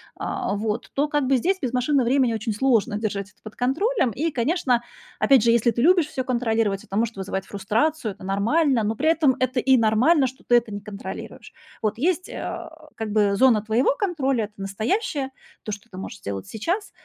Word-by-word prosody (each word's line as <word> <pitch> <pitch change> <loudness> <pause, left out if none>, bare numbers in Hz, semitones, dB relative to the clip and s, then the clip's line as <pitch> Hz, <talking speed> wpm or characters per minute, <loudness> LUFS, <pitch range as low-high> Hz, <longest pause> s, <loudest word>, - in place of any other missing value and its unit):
а, 200 - -3
вот, 210 +1 -3
то 290 +2 +1
как 295 -3 0
бы 270 -1 +4
здесь 380 +9 0
без 250 -3 -1
машины 255 +1 +2
времени 250 -1 +2
очень 220 0 -2
сложно 230 -2 +2
держать 205 -2 -3
это - - -29
под 215 - -10
контролем. 270 - +1
И, 320 +9 -1
конечно, 255 -1 +1 0.4
опять 265 -5 +5
же, 230 - +4
если 235 0 +3
ты 235 - -2
любишь 345 0 +4
всё 260 -4 -3
контролировать, 225 -5 0
это 195 - -5
может 230 -1 0
вызывать 190 0 -4
фрустрацию, 220 +6 -1
это - - -15
нормально, 230 - +2
но 220 +2 -1
при 310 - -1
этом 305 -6 +3
это 255 0 0
и 260 0 +4
нормально, 250 +7 +4
что 260 +2 -11
ты 240 - +3
это 235 -2 +2
не 205 - -5
контролируешь. 210 +2 -8 0.3
Вот 215 0 -1
есть, 360 +6 0
а, 320 -1 -7
как 220 -2 -4
бы 205 -2 +2
зона 245 -3 +4
твоего 230 +5 +2
контроля, 310 -9 0
это 215 -3 -2
настоящее, 260 - -2 0.3
то, 215 - -5
что 205 +3 -8
ты 185 - -10
можешь 205 +3 -7
сделать 100 -1 -5
сейчас, 345 - -3
240 Hz, 200 wpm, -23 LUFS, 215-280 Hz, 0.4 s, опять